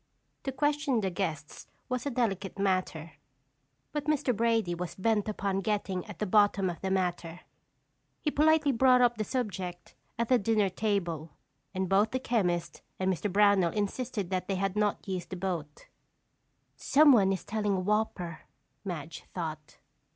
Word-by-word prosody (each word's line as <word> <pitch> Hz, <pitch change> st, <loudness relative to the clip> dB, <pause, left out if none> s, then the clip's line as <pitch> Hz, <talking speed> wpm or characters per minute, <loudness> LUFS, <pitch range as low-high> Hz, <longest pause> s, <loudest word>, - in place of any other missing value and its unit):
To 270 Hz, -, -1 dB
question 290 Hz, -2 st, +1 dB
the 190 Hz, -2 st, -1 dB
guests 160 Hz, -5 st, -4 dB, 0.2 s
was 250 Hz, +2 st, -2 dB
a -, -, +1 dB
delicate 205 Hz, -7 st, -1 dB
matter, 185 Hz, -5 st, -1 dB, 0.8 s
but 295 Hz, -1 st, -3 dB
Mr. 285 Hz, -5 st, +1 dB
Brady 225 Hz, -4 st, +1 dB
was 175 Hz, 0 st, -5 dB
bent 215 Hz, +1 st, +1 dB
upon 195 Hz, -2 st, -1 dB
getting 195 Hz, -2 st, -1 dB
at 210 Hz, -, -9 dB
the 210 Hz, -, -1 dB
bottom 200 Hz, -2 st, +3 dB
of 170 Hz, -, -10 dB
the 190 Hz, -, -2 dB
matter. 180 Hz, -2 st, -2 dB, 0.8 s
He 300 Hz, -, -1 dB
politely 310 Hz, 0 st, +4 dB
brought 255 Hz, 0 st, +5 dB
up 240 Hz, -2 st, +3 dB
the -, -, +1 dB
subject 190 Hz, -7 st, -4 dB, 0.2 s
at 235 Hz, 0 st, 0 dB
the 250 Hz, 0 st, +4 dB
dinner 210 Hz, -1 st, +2 dB
table, 175 Hz, -7 st, -2 dB, 0.4 s
and 190 Hz, 0 st, -2 dB
both 200 Hz, +4 st, +3 dB
the 260 Hz, -, -2 dB
chemist 180 Hz, -9 st, -1 dB, 0.2 s
and 190 Hz, 0 st, +1 dB
Mr. 195 Hz, +3 st, -3 dB
Brownell 200 Hz, -3 st, +4 dB
insisted 210 Hz, -1 st, -2 dB
that 185 Hz, -1 st, -1 dB
they 195 Hz, -, -1 dB
had 195 Hz, +1 st, -1 dB
not 210 Hz, -1 st, 0 dB
used 185 Hz, -2 st, -4 dB
the 190 Hz, -, -5 dB
boat. 175 Hz, -5 st, -4 dB, 0.9 s
"Someone 270 Hz, -10 st, +5 dB
is 190 Hz, -, -3 dB
telling 210 Hz, -2 st, -1 dB
a -, -, 0 dB
whopper," 185 Hz, -4 st, -1 dB, 0.4 s
Madge 165 Hz, -5 st, -6 dB
thought. 155 Hz, -4 st, -5 dB
200 Hz, 160 wpm, -29 LUFS, 180-230 Hz, 0.9 s, brought